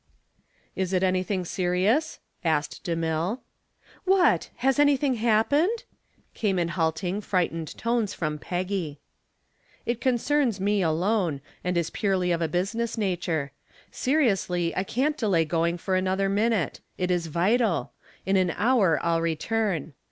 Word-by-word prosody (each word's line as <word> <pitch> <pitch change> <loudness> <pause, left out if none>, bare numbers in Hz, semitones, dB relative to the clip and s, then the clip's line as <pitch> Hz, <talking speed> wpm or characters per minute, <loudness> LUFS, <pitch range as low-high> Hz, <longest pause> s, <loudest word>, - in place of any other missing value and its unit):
"Is 190 0 -2
it 185 0 +2
anything 185 0 0
serious?" 190 - +1 0.3
asked 155 -3 -1
DeMille. 165 +4 -1 0.7
"What! 380 -1 +3
has 270 +2 +1
anything 285 -2 +4
happened?" 250 - +2 0.5
came 200 -4 0
in 170 -1 0
halting, 175 +4 -1
frightened 165 -5 -1
tones 230 -3 0
from 155 -2 -2
Peggy. 180 -4 -3 0.9
"It 235 0 -2
concerns 255 -2 +1
me 205 +1 +1
alone, 175 -1 +1 0.2
and 180 -1 0
it - - +5
is 170 - -2
purely 190 -3 0
of 170 -1 0
a 165 - +1
business 220 +8 -2
nature. 175 -8 -1 0.4
Seriously, 195 - +1
I 185 - 0
can't 280 +9 0
delay 190 - +2
going 170 +2 0
for 185 +2 -1
another 190 +1 +1
minute. 205 - +1 0.2
It 180 0 0
is 175 -2 0
vital. 190 +5 +1 0.3
In 195 0 +2
an 185 -1 +2
hour 210 -8 +3
I'll 165 -1 +1
return. 170 -1 -1
185 Hz, 135 wpm, -26 LUFS, 170-225 Hz, 0.9 s, it